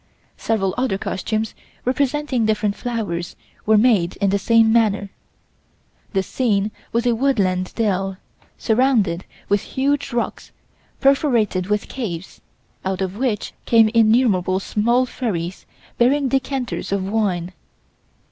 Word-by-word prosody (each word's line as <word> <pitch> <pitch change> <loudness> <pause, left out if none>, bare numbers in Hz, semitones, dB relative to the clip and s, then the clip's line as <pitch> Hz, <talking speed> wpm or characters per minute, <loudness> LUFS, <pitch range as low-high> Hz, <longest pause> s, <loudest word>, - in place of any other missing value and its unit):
Several 195 -4 0
other 250 -7 0
costumes 215 +3 -2 0.3
representing 275 -1 0
different 210 -1 0
flowers 205 -9 -3 0.3
were 220 0 +5
made 210 -7 +3
in 200 -1 +1
the 200 - +1
same 225 +1 +4
manner. 205 -4 +2 1.0
The 190 -1 +1
scene 210 -2 0 0.2
was 235 +1 0
a 240 - +3
woodland 200 -8 +1
dell, 195 -4 0 0.4
surrounded 220 -7 +1 0.2
with 205 0 +2
huge 280 +1 -1
rocks 235 0 -3 0.5
perforated 240 - +2
with 210 0 -1
caves, 190 -9 -6 0.4
out 190 -1 -2
of 190 0 -2
which 230 -2 -2
came 225 -2 +5
innumerable 215 -5 +3
small 235 +6 +1
fairies 190 -9 -4 0.3
bearing 265 +3 +3
decanters 265 -3 -2
of 195 -1 -1
wine. 190 -4 -1
220 Hz, 120 wpm, -21 LUFS, 195-245 Hz, 1.0 s, were